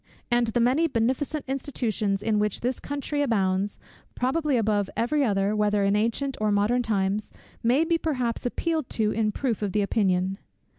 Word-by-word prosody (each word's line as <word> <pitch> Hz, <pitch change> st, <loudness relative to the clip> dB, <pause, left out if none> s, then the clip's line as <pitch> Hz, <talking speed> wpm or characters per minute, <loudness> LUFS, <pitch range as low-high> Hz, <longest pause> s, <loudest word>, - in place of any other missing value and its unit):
And 240 Hz, 0 st, +3 dB
the 225 Hz, +2 st, 0 dB
many 260 Hz, +8 st, +3 dB
beneficent 265 Hz, +4 st, -1 dB
institutions 225 Hz, -7 st, -1 dB
in 215 Hz, -1 st, +1 dB
which 210 Hz, -1 st, -1 dB
this 250 Hz, +2 st, -1 dB
country 290 Hz, +1 st, -3 dB
abounds, 200 Hz, -5 st, 0 dB, 0.4 s
probably 280 Hz, +2 st, +1 dB
above 210 Hz, -3 st, +1 dB
every 285 Hz, +6 st, +1 dB
other, 200 Hz, -3 st, +1 dB
whether 210 Hz, -1 st, +2 dB
in 200 Hz, +1 st, +2 dB
ancient 235 Hz, +6 st, 0 dB
or 215 Hz, -1 st, +2 dB
modern 210 Hz, +5 st, +2 dB
times, 205 Hz, -2 st, -1 dB, 0.3 s
may 250 Hz, +7 st, +3 dB
be 335 Hz, 0 st, +1 dB
perhaps 255 Hz, -8 st, -1 dB
appealed 315 Hz, +2 st, -2 dB
to 215 Hz, -2 st, +2 dB
in 215 Hz, -1 st, 0 dB
proof 235 Hz, -2 st, -2 dB
of 200 Hz, -3 st, -2 dB
the 210 Hz, -, +2 dB
opinion. 190 Hz, -2 st, +1 dB
225 Hz, 165 wpm, -26 LUFS, 205-265 Hz, 0.4 s, And